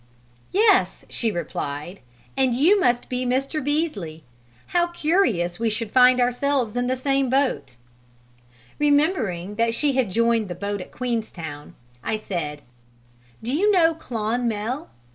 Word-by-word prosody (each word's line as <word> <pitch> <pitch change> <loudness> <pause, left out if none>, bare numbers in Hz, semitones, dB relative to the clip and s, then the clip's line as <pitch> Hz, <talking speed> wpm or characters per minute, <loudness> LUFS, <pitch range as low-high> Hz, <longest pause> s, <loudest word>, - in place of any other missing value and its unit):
"Yes," 410 0 +3
she 230 -2 -1
replied, 170 -1 -5 0.4
"and 260 -3 +2
you 345 +11 +4
must 245 -8 +1
be 250 0 -2
Mr. 270 +4 -1
Beesley; 240 - -2 0.5
how 345 -1 +2
curious 300 - +1
we 230 -1 +1
should 215 0 -3
find 255 0 +6
ourselves 245 -1 +1
in 245 0 0
the 255 - +1
same 270 0 0
boat!" 260 - 0 1.0
Remembering 265 - +1
that 230 0 +1
she 290 +1 +1
had 255 -5 +1
joined 230 +1 +2
the 175 - -5
boat 200 +2 -3
at - - -10
Queenstown, 190 -12 -5 0.3
I 220 - -1
said, 165 -9 -4 0.8
"Do 245 +5 -1
you 410 +6 +3
know 335 -4 +4
Clonmel? 235 -1 -2
245 Hz, 135 wpm, -23 LUFS, 205-285 Hz, 1.0 s, find